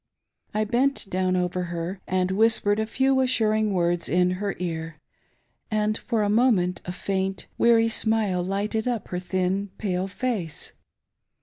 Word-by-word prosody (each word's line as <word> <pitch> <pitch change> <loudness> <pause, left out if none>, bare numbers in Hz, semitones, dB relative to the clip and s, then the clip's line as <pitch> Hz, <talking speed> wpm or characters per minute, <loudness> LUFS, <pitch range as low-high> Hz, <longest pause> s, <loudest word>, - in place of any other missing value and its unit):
I 215 - 0
bent 245 +3 0
down 185 0 +1
over 180 0 -1
her 175 +2 -5
and 185 0 0
whispered 210 0 +3
a 220 - -1
few 265 +3 +2
assuring 220 -4 +2
words 175 -2 +1
in 180 +1 +3
her 205 -1 -2
ear, 165 -3 -4 0.7
and 215 -1 +1
for 225 -1 -1
a - - +1
moment 210 -6 +2
a 180 - -4
faint, 190 +1 -2
weary 230 -1 +5
smile 220 -5 +2
lighted 205 +4 -2
up 235 -5 -2
her 180 - -2
thin, 185 +2 -1
pale 190 -2 -1
face. 195 -5 -4
195 Hz, 145 wpm, -25 LUFS, 180-220 Hz, 0.7 s, weary